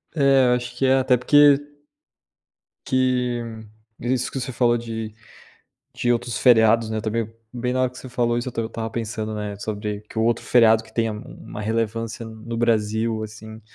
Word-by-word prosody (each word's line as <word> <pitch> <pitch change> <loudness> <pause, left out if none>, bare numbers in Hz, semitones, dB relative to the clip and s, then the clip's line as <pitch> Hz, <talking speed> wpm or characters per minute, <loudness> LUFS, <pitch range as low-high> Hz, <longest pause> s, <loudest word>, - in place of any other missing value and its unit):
É, 135 -3 +4
eu - - +4
acho 125 0 -5
que 135 - 0
é 130 0 +5
até 130 -1 +3
porque 145 +3 +6 1.3
que, 125 -2 +1 0.6
isso 125 +1 -1
que 135 - -3
você 130 +1 -4
falou 120 0 +2
de 115 -2 -5 0.8
de 120 - 0
outros 120 0 0
feriados, 115 -2 +5
né, 110 -1 -3
também, 115 0 -2 0.2
bem 125 0 -2
na 130 - +1
hora 130 - +1
que 125 - -13
você 130 - -9
falou 120 -1 0
isso 120 - -3
eu - - -4
estou 115 -1 -3
eu - - -4
estava 115 -1 -4
pensando, 110 -1 -4
né, 105 -1 -4
sobre 105 0 -4
que - - -6
o - - +2
outro 115 +1 +1
feriado 115 -2 +5
que 110 - -18
tenha 115 -1 0
uma 105 -1 -9
relevância 115 +1 -2
no 110 +1 -7
Brasil 110 -1 0
assim, 110 0 -9
115 Hz, 190 wpm, -23 LUFS, 110-125 Hz, 1.3 s, porque